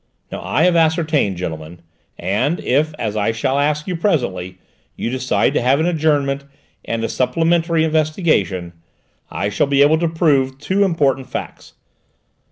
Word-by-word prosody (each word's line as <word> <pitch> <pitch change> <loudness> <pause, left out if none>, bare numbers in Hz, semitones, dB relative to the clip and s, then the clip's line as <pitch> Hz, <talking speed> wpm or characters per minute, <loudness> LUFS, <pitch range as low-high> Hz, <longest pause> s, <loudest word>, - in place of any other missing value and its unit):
"Now - - -5
I 150 - +1
have 180 -1 +4
ascertained, 160 - +1
gentlemen, 80 -1 -6 0.4
and 100 - -1
if, 150 +5 +1
as 110 -2 -3
I 105 +1 +1
shall 130 +4 -1
ask 150 +1 0
you 185 - -3
presently, 120 - -1 0.4
you 115 - -3
decide 130 0 0
to - - +1
have 130 +4 +3
an 160 - +1
adjournment 145 -5 +1 0.4
and 115 0 -3
a - - 0
supplementary 165 +5 +1
investigation 155 - 0 0.6
I 100 - -2
shall 105 +7 0
be 140 0 +4
able 155 +2 +4
to 170 - +1
prove 140 -5 +1
two 190 +8 0
important 140 -8 0
facts. - - -7
140 Hz, 155 wpm, -19 LUFS, 115-160 Hz, 0.6 s, have